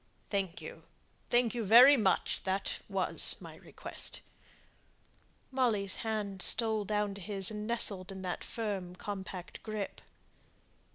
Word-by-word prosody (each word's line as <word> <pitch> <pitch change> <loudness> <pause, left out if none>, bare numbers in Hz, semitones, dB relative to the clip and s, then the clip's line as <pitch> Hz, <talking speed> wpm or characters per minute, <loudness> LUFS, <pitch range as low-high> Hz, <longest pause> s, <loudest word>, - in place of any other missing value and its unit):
"Thank 195 -4 -2
you; - - -9 0.5
thank 240 -1 +3
you 235 -2 -2
very 245 +7 +9
much. 205 -7 +1
That 190 +1 -2
was - - +2
my - - -11
request." - - -7 1.3
Molly's 225 -7 +1
hand 210 -4 -3
stole 220 0 +4
down 210 0 -1
to 200 - -9
his, 195 0 +2
and 210 0 -5
nestled 200 -5 0
in 190 -1 -8
that 180 -1 -4
firm 195 -6 -4
compact 190 -2 -7
grasp. 215 -2 -5
205 Hz, 125 wpm, -32 LUFS, 190-225 Hz, 1.3 s, very